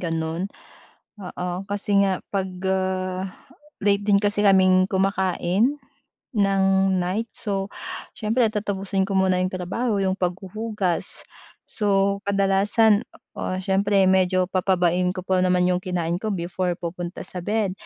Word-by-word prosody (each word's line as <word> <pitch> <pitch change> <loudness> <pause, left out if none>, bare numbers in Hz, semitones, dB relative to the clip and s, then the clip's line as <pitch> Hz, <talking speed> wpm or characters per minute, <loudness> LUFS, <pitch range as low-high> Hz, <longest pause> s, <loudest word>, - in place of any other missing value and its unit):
gano'n, 165 +2 -2 0.7
oo, 180 -1 -5 0.2
kasi 205 0 +1
nga 195 -2 0
pag, 190 -1 -1 0.2
ah, 185 0 -1 0.5
late 200 0 +2
din 200 -1 +4
kasi 205 0 0
kaming 185 -2 +5
kumakain 190 +6 +1 0.6
ng 195 -1 +3 0.4
night, 200 +6 -2
so 195 -1 -3 0.4
siyempre 225 +3 +1
tatapusin 195 -2 -1
ko 195 - -1
muna 185 -1 +3
iyong 185 - +1
trabaho 195 +5 -2
'yung 190 -1 0
paghuhugas. 190 +1 -3 0.4
So 200 -1 +1
kadalasan, 200 +2 +3 0.3
oo, 185 - -3
siyempre 195 +1 +2
medyo 185 0 +3
pababain 180 -1 +1
ko 185 - -5
pa 185 -1 +1
naman 180 -1 +3
'yong 180 0 +1
kinain 175 -1 -2
ko 220 - -3
before 180 -2 -2
pupunta 175 0 -6
sa 180 0 -6
bed, 210 +1 0
190 Hz, 130 wpm, -23 LUFS, 185-200 Hz, 0.7 s, kaming